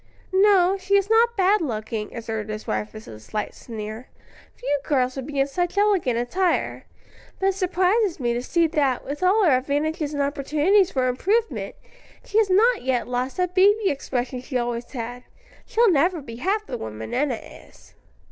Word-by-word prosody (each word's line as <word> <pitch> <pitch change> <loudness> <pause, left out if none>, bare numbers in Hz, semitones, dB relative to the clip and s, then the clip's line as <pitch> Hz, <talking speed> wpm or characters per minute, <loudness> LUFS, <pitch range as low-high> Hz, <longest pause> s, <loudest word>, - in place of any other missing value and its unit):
"No, 385 -1 +4
she 390 +1 +1
is 400 +2 -1
not 470 +1 +4
bad 390 +2 +3
looking," 220 -5 -4
observed 220 -2 -4
his 215 0 -5
wife 210 - -2
with 215 0 -11
a 110 - -10
slight 210 - -4
sneer; 220 +1 -8 0.5
"few 290 -13 -1
girls 255 -4 0
would 265 -2 -5
be 285 -2 -3
in 270 - +4
such 350 +7 -2
elegant 390 - +2
attire; 345 +10 -1 0.5
but 385 - +2
it - - 0
surprises 375 +1 +1
me 240 -2 0
to 240 - -2
see 335 +6 +1
that, 290 -6 0
with 285 +4 -5
all 390 +3 +4
her 325 - +5
advantages 295 +3 -1
and 285 - +1
opportunities 305 +7 +2
for 255 -1 0
improvement, 410 - -1 0.5
she 430 - +1
has 430 -3 +2
not 450 +5 +4
yet 255 -2 -1
lost 250 +4 -2
that 360 -1 0
baby 400 +2 +4
expression 255 -2 -3
she 255 0 -3
always 240 0 -3
had. 245 0 -6 0.4
She'll 470 -3 +3
never 340 +3 +2
be 230 -5 -9
half 405 - -1
the - - -5
woman 110 0 -7
Enna 270 -2 +1
is." - - -15
290 Hz, 180 wpm, -23 LUFS, 245-385 Hz, 0.5 s, her